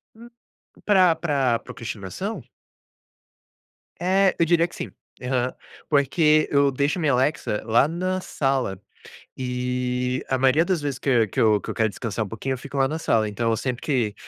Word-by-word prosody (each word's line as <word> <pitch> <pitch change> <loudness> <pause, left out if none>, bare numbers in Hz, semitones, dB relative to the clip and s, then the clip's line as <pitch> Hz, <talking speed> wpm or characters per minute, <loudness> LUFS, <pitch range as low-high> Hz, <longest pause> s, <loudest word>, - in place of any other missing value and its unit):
N 235 +2 -13 0.6
Pra 185 -5 +5
pra 140 -7 +1
procrastinação? 115 - -6 1.6
Eh, 190 +1 +3
eu 170 - +4
diria 170 0 +3
que - - -14
sim. - - -6 0.3
Aham. 125 0 -1 0.4
Porque 150 +2 +3
eu 140 -1 +4
deixo 140 +5 0
a - - -3
minha 150 -4 +2
Alexa 130 -4 0
lá 115 +5 +4
na 185 +3 -2
sala 135 - -1 0.6
e, 125 0 -2
a 130 - +1
maioria 135 +5 +4
das 180 -3 0
vezes 140 -3 -3
que - - -5
eu 115 -4 +3
que - - -2
eu 105 -2 +4
que - - -7
eu - - -4
quero 110 -1 +2
descansar 110 +1 -3
um - - -8
pouquinho, 125 +6 -3
eu - - -7
fico 140 +2 -8
lá 135 -1 +3
na 160 +2 -3
sala. 110 -8 +1
Então, 115 +3 -1
eu 115 - +1
sempre 125 +1 -3
que 120 -8 0
135 Hz, 180 wpm, -24 LUFS, 120-160 Hz, 1.6 s, Pra